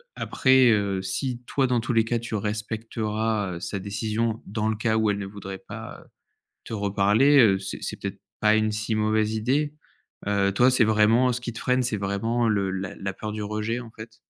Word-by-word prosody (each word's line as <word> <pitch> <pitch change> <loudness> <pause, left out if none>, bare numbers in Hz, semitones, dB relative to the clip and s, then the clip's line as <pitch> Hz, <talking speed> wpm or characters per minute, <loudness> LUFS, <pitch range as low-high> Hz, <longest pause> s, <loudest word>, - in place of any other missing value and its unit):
après, 130 -2 +4
heu, 100 -3 +1
si 120 +6 -2
toi, 135 - +1
dans 125 -1 +1
tous 120 +1 -2
les 115 - +4
cas, 120 0 0
tu 115 -1 -5
respecteras, 110 -1 -2
heu, - - -6
sa 100 +2 -4
décision, 110 +3 -2
dans 110 +2 -2
le 110 - 0
cas 110 0 0
où 110 -1 +2
elle 100 - -2
ne 100 - -4
voudrait 95 -1 -8
pas, - - -8
heu, - - -23 0.6
te 115 - -6
reparler, 105 +7 +3
heu, 100 -5 +5
c'est 95 0 -5
c'est - - -4
peut-être 100 0 -5 0.2
pas 110 0 +4
une 110 0 +1
si 105 +1 -2
mauvaise 110 0 +1
idée. 140 +7 0 0.5
Heu, 100 -1 +2
toi, 125 +6 +4
c'est 125 -3 +4
vraiment 110 +4 +4
ce 125 - -3
qui 120 - -4
te 115 - -8
freine, 125 0 +1
c'est 115 -3 0
vraiment 115 +4 0
le 100 -3 +1
la 95 0 -4
la 95 0 -4
peur 105 +2 -5
du 105 0 -4
rejet, 110 +3 -2
en 115 - -10
fait? 110 +1 -11
110 Hz, 215 wpm, -25 LUFS, 100-115 Hz, 0.6 s, heu